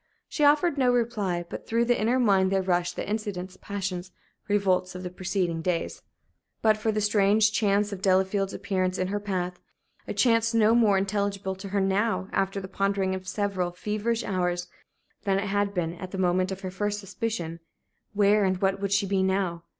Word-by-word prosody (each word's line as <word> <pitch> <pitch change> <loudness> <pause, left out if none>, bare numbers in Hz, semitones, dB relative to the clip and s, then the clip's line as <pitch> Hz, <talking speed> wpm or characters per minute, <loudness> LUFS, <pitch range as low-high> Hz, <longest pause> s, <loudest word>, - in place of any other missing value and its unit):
She 300 - -2
offered 295 +1 +4
no 250 -2 +4
reply; 210 -8 0
but - - -8
through 230 +1 +2
the 245 -1 +1
inner 235 +4 +2
mind 195 -6 +3
there 195 -1 +1
rushed 175 -1 0
the - - -4
incidents, 200 -4 -4
passions, 190 -2 -4 0.4
revolts 185 -3 +1
of 180 - -6
the 180 - -5
preceding 180 -2 -2
days. 170 0 -2 0.6
But 215 -1 +5
for 215 +1 -1
that 215 0 -1
strange 210 0 +3
chance 205 -1 +1
of 190 - -7
Delafield's 190 +1 +2
appearance 185 -1 -1
in 185 0 -1
her 205 +1 -1
path 180 -3 -3 0.5
a - - -3
chance 230 -1 +3
no 220 0 +5
more 220 -4 +4
intelligible 195 0 -1
to 190 +1 -8
her 200 +1 0
now, 195 +1 0
after 195 +1 0
the 190 - -7
pondering 195 0 0
of 185 0 -6
several 190 -3 -1
feverish 215 +5 -2
hours, 180 -2 -1 0.5
than 195 -2 +1
it 200 +1 -2
had 205 0 +1
been 170 -4 -2
at 180 +1 -8
the 190 - -6
moment 185 +1 +1
of 190 0 -5
her 185 -2 -5
first 205 +2 -2
suspicion 195 -5 -4 0.5
where 205 0 +4
and 190 -1 +1
what 195 0 +1
would 200 -1 -2
she 200 0 +2
be 195 -1 +1
now? 190 -3 0
195 Hz, 190 wpm, -27 LUFS, 185-210 Hz, 0.6 s, But